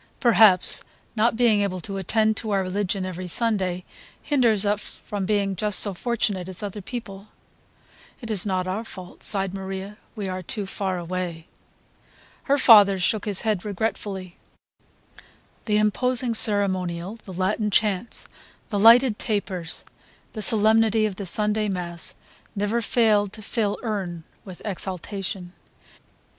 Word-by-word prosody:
Perhaps 220 -6 +5 0.3
not 225 +1 +2
being 225 -3 +3
able 190 -2 -1
to 195 +3 -5
attend 215 +3 +1
to 220 - -3
our 195 -2 +1
religion 190 0 -2
every 185 0 -5
Sunday 185 -3 -1 0.4
hinders 235 -8 +2
us 205 0 +1 0.2
from 200 -3 -3
being 200 -2 0
just 210 +1 +2
so 200 - +3
fortunate 200 -3 -2
as 185 +2 -3
other 205 0 -5
people." 200 -2 -8 0.9
"It 230 -3 -6
is 200 -4 +1
not 185 -2 -1
our 195 +5 -2
fault," 185 -5 -11
sighed 195 -2 +1
Maria, 195 +1 -6 0.2
"we 205 -3 -4
are 185 0 -4
too 200 +3 -4
far 190 -1 -3
away." 175 -1 -4 1.0
Her 280 0 +3
father 205 -7 +7
shook 195 +3 0
his 205 -3 +1
head 215 -5 -1
regretfully. 200 -3 -4 1.3
The 210 -2 +2
imposing 245 +3 +2
ceremonial, 190 -3 +1
the 210 - -12
Latin 200 +4 0
chants, 210 +2 0 0.4
the 205 - -1
lighted 230 +1 +6
tapers, 190 -6 -3 0.5
the 215 - -5
solemnity 220 0 +4
of 200 -3 -3
the 200 - -5
Sunday 210 +3 +1
mass 175 -3 -4 0.4
never 205 +3 0
failed 210 -3 +2
to 215 - -8
fill 210 -2 -1
him 190 -7 -3 0.2
with 185 -3 -10
exaltation. 190 -1 -4
205 Hz, 140 wpm, -24 LUFS, 185-220 Hz, 1.3 s, father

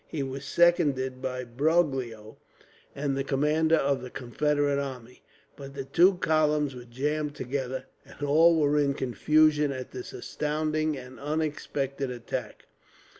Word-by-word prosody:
He 150 -3 -3
was 135 +1 -6
seconded 140 -6 +2
by 130 -1 -3
Broglio 130 -5 0 0.6
and 140 -1 -1
the 135 - -1
commander 150 +4 +2
of 140 -3 +1
the 125 - -7
Confederate 145 +3 0
army, 125 -3 -8 0.3
but 140 0 -10
the 135 -1 -5
two 180 +7 +4
columns 150 -4 +1
were 125 -1 -10
jammed 145 +4 -2
together, 130 0 -3 0.2
and - - -11
all 160 +3 +5
were 150 0 +3
in 140 -1 +1
confusion 150 +3 +3
at 130 -1 -6
this 125 -1 -7
astounding 155 0 -2
and 130 0 -10
unexpected 145 -2 -2
attack. 120 -1 -6
140 Hz, 135 wpm, -27 LUFS, 130-150 Hz, 0.6 s, all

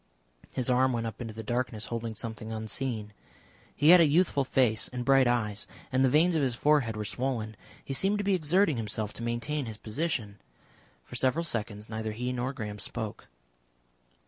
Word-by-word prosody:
His 125 - -1
arm 130 0 +3
went 115 -1 -1
up 115 +2 -5
into 115 -3 -6
the 110 - -6
darkness 120 -1 -2
holding 115 -1 -3
something 110 -1 -5
unseen. 110 -1 -3 0.6
He 150 - +4
had 180 0 +10
a 160 - +6
youthful 150 -2 +3
face 120 -5 +2
and 125 -1 -5
bright 135 -1 +5
eyes, 110 -4 0 0.2
and 130 0 +3
the 130 - +5
veins 165 +6 +4
of 155 - +2
his 130 -4 +1
forehead 130 -5 +2
were 105 - -3
swollen. 115 -2 -2 0.3
He 135 - -3
seemed 195 +9 +1
to 205 - -1
be 200 0 +2
exerting 175 -2 +2
himself 110 -1 -2
to - - -8
maintain 120 +4 -2
his 110 -1 -6
position. 110 -4 -3 0.6
For - - -15
several 140 +6 +1
seconds 105 -6 -4
neither 110 -1 -4
he 125 +3 -2
nor 125 +1 -1
Graham 105 -5 -6
spoke. 110 0 -5
120 Hz, 185 wpm, -29 LUFS, 110-140 Hz, 0.6 s, had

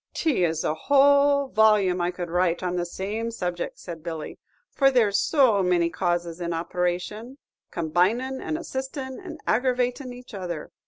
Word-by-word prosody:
"'T 295 - +1
is 160 -2 0
a - - 0
whole 280 - +4
volume 210 -5 +3
I 175 - +1
could 175 -1 -5
write 175 0 +1
on 180 -1 -1
the 175 -1 -1
same 210 +6 -4
subject," 180 -6 -4
said 170 -3 -8
Billy; 160 -2 -6 0.3
"for 275 -1 +4
there's 225 -6 +3
so 255 -10 +3
many 175 -2 +2
causes 175 -1 -2
in 170 0 -2
operation, 180 +8 -3 0.3
com 160 -3 -4
binin', 235 +10 +1
and 315 - -2
assistin', 265 -3 -5
and - - -9
aggravatin' 250 +1 0
each 245 -1 -12
other. 175 -5 -5
195 Hz, 160 wpm, -25 LUFS, 175-255 Hz, 0.3 s, whole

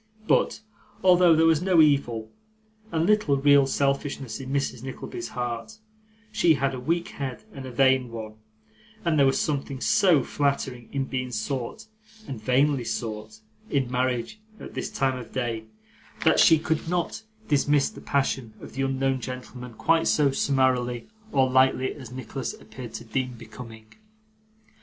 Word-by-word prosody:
But, - - +2 0.4
although 180 -2 +6
there 160 +1 +4
was 160 -1 +4
no 180 -2 +3
evil 120 -8 +2 0.6
and 160 0 +1
little 210 -9 +3
real 140 0 +5
selfishness 140 -3 -1
in 130 -1 -7
Mrs. 135 -4 -1
Nickleby's 135 - -6
heart, 120 - -4 0.5
she 190 -7 +4
had 135 0 0
a 130 - -4
weak 170 +7 -1
head 135 +1 -6
and 135 -2 -7
a - - -7
vain 130 0 +3
one; 110 -2 -7 0.7
and 160 -3 +2
there 140 - +6
was 135 - +2
something 140 -2 -2
so 165 -1 +4
flattering 135 -4 -2
in 135 -1 -1
being 130 -1 -3
sought 120 +2 -4 0.4
(and 125 -5 -6
vainly 130 +3 +2
sought) 110 -1 -5 0.3
in 135 -3 0
marriage 125 - -1 0.2
at - - -9
this - - -3
time 130 -1 0
of 120 - -11
day, 115 -3 -2 0.6
that - - +5
she 160 - +7
could 160 +1 -2
not 175 +4 -1 0.3
dismiss 145 -1 +2
the - - -12
passion 135 -5 -1
of - - -11
the 135 - -3
unknown 135 0 0
gentleman 125 -1 -7
quite 165 +7 +2
so 145 -2 +3
summarily 130 -3 +1 0.2
or 135 -2 +3
lightly 130 0 +3
as 130 -5 -11
Nicholas 130 0 -5
appeared 115 +1 -10
to - - -6
deem 125 +3 -2
becoming. 115 -1 -11
135 Hz, 155 wpm, -26 LUFS, 125-145 Hz, 0.7 s, she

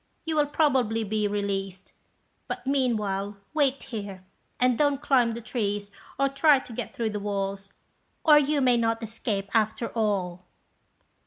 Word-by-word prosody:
You 320 -1 -1
will 295 -1 +3
probably 260 -7 +2
be 210 0 0
released; 195 -2 -3 0.5
but, - - -5
meanwhile, 210 -7 0 0.2
wait 280 -3 +1
here, 200 -5 -7 0.3
and 250 -1 +3
don't 285 +1 +2
climb 255 -6 +2
the 235 - -6
trees, 205 -4 -3 0.3
or 275 - +3
try 280 +2 +4
to 260 -2 -8
get 235 0 -5
through 225 -2 -1
the 210 - -3
walls, 195 -1 -3 0.6
or 300 -2 +8
you 295 0 +1
may 250 -2 +4
not 230 0 0
escape 210 -3 -3
after 220 +1 +1
all." 190 -5 -1
225 Hz, 150 wpm, -26 LUFS, 200-270 Hz, 0.6 s, or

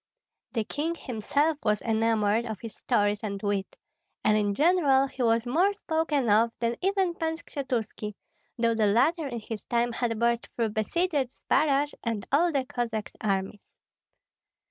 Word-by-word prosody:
The 225 -3 0
king 315 +9 -2
himself 290 +4 0
was 210 -1 +1
enamored 225 0 +1
of 220 -3 -5
his 225 -2 -8
stories 205 0 +1
and 200 -2 -4
wit; 205 -2 -1 0.5
and 215 - +4
in 205 -1 +1
general 290 - +4
he 265 -1 -7
was 230 0 +2
more 340 +11 +3
spoken 320 - 0
of 220 +2 +4
than 235 0 0
even 385 -2 +1
Pan 320 -1 -2
Skshetuski, 235 -9 -4 0.4
though 230 -1 +2
the 220 -2 +2
latter 285 +10 +2
in 240 -3 -4
his 215 -1 -6
time 240 0 +1
had 230 -1 -1
burst 235 +1 +1
through 230 -2 0
besieged 315 - -1 0.2
Zbaraj 285 +2 +1
and 225 -4 -2
all 335 +5 +4
the 275 -4 0
Cossack 230 -4 -3
armies. 195 0 -1
235 Hz, 155 wpm, -27 LUFS, 215-290 Hz, 0.5 s, and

